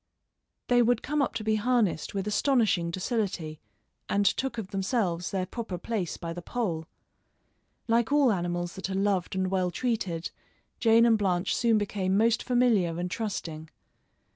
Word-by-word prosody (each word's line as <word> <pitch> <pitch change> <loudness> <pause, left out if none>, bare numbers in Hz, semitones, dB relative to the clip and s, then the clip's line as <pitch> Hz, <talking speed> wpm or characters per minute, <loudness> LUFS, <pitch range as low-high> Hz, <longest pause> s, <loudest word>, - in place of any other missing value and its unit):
They 245 -1 +4
would 240 -1 +2
come 300 +1 0
up 275 - -1
to 220 - -3
be 215 0 +1
harnessed 215 -7 0
with 195 +1 -2
astonishing 210 -6 +2
docility, 180 -5 -2 0.5
and 200 0 +1
took 260 +3 0
of 210 -4 -5
themselves 190 -3 -1
their 190 -2 -1
proper 220 -2 -5
place 190 -2 -3
by 165 0 -5
the 175 - -7
pole. 175 -7 -3 1.0
Like 230 +1 +2
all 285 -4 +5
animals 175 -2 -2
that 190 0 -5
are 190 - -2
loved 195 -2 0
and 185 0 0
well 185 -2 +1
treated, 190 -6 -2 0.5
Jane 230 0 +5
and 225 -2 +4
Blanche 185 -2 +1
soon 230 -2 +3
became 195 -2 0
most 230 +2 +3
familiar 225 -10 +2
and 180 0 -3
trusting. 165 -8 -4
200 Hz, 160 wpm, -28 LUFS, 180-230 Hz, 1.0 s, all